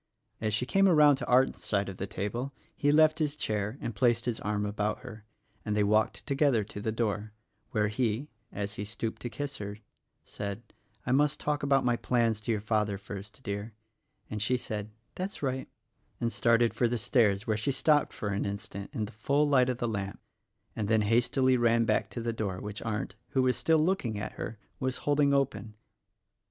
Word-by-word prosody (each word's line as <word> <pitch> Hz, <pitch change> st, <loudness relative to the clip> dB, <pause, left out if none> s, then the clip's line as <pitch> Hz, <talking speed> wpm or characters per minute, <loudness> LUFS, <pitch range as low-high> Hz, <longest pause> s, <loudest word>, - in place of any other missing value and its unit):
As 110 Hz, -1 st, 0 dB
she 125 Hz, -, 0 dB
came 195 Hz, +8 st, +4 dB
around 150 Hz, -5 st, +6 dB
to -, -, -5 dB
Arndt's 130 Hz, +1 st, +3 dB
side 100 Hz, -1 st, 0 dB
of 95 Hz, -2 st, -6 dB
the 95 Hz, -, -3 dB
table 120 Hz, +9 st, -3 dB, 0.2 s
he 145 Hz, -, +2 dB
left 155 Hz, +1 st, +5 dB
his 150 Hz, -2 st, 0 dB
chair 105 Hz, -3 st, -2 dB
and 115 Hz, -, -4 dB
placed 120 Hz, +1 st, +2 dB
his 120 Hz, -2 st, -1 dB
arm 105 Hz, 0 st, -1 dB
about 105 Hz, +1 st, -1 dB
her 110 Hz, -4 st, -10 dB, 0.4 s
and 105 Hz, 0 st, -1 dB
they 105 Hz, -, +4 dB
walked 110 Hz, +2 st, +2 dB
together 140 Hz, -5 st, +2 dB
to 100 Hz, 0 st, -8 dB
the 110 Hz, -, -1 dB
door 110 Hz, -1 st, -2 dB, 0.4 s
where 105 Hz, -2 st, +1 dB
he 115 Hz, +4 st, -1 dB
— -, -, -43 dB
as 100 Hz, 0 st, -4 dB
he -, -, -3 dB
stooped 110 Hz, +2 st, -4 dB
to 120 Hz, -, -3 dB
kiss 145 Hz, +3 st, -4 dB
her 100 Hz, 0 st, -6 dB, 0.3 s
— -, -, -52 dB
said, 100 Hz, +2 st, -5 dB, 0.4 s
"I 125 Hz, -, -1 dB
must 145 Hz, +2 st, +3 dB
talk 150 Hz, 0 st, -1 dB
about 135 Hz, -2 st, +3 dB
my 120 Hz, -1 st, +2 dB
plans 115 Hz, -4 st, +1 dB
to 110 Hz, -, -1 dB
your 105 Hz, -2 st, 0 dB
father, 105 Hz, -2 st, 0 dB
first, 105 Hz, +4 st, -9 dB
dear," 100 Hz, 0 st, -4 dB, 0.5 s
and 105 Hz, -1 st, -4 dB
she 125 Hz, +4 st, +2 dB
said, 110 Hz, -3 st, -5 dB, 0.2 s
"That's 185 Hz, -3 st, -5 dB
right," 130 Hz, -1 st, -2 dB, 0.5 s
and 115 Hz, -1 st, -1 dB
started 115 Hz, 0 st, +3 dB
for 120 Hz, -, +2 dB
the 120 Hz, +1 st, -1 dB
stairs 105 Hz, -3 st, +2 dB
where 110 Hz, -, +1 dB
she 110 Hz, +6 st, 0 dB
stopped 145 Hz, +2 st, +3 dB
for 105 Hz, -, -4 dB
an 100 Hz, 0 st, -1 dB
instant 100 Hz, 0 st, -5 dB
in 110 Hz, -, -1 dB
the 105 Hz, -, -9 dB
full 140 Hz, +8 st, +1 dB
light 130 Hz, -3 st, +4 dB
of 125 Hz, -, -1 dB
the 120 Hz, -, -1 dB
lamp 100 Hz, -3 st, -3 dB, 0.6 s
and 105 Hz, -2 st, -2 dB
then 110 Hz, 0 st, +3 dB
hastily 125 Hz, +4 st, +3 dB
ran 115 Hz, -1 st, +3 dB
back -, -, +1 dB
to 120 Hz, -, -5 dB
the 115 Hz, 0 st, -1 dB
door 100 Hz, -5 st, -3 dB
which 105 Hz, 0 st, -6 dB
Arndt 110 Hz, -3 st, -3 dB
— -, -, -46 dB
who 130 Hz, -, +3 dB
was 125 Hz, 0 st, +3 dB
still 160 Hz, -1 st, +3 dB
looking 155 Hz, -, +1 dB
at 100 Hz, -, -4 dB
her 110 Hz, -, -6 dB
— -, -, -41 dB
was 130 Hz, -1 st, -1 dB
holding 145 Hz, -1 st, +3 dB
open. 135 Hz, -6 st, 0 dB
115 Hz, 210 wpm, -30 LUFS, 105-130 Hz, 0.6 s, around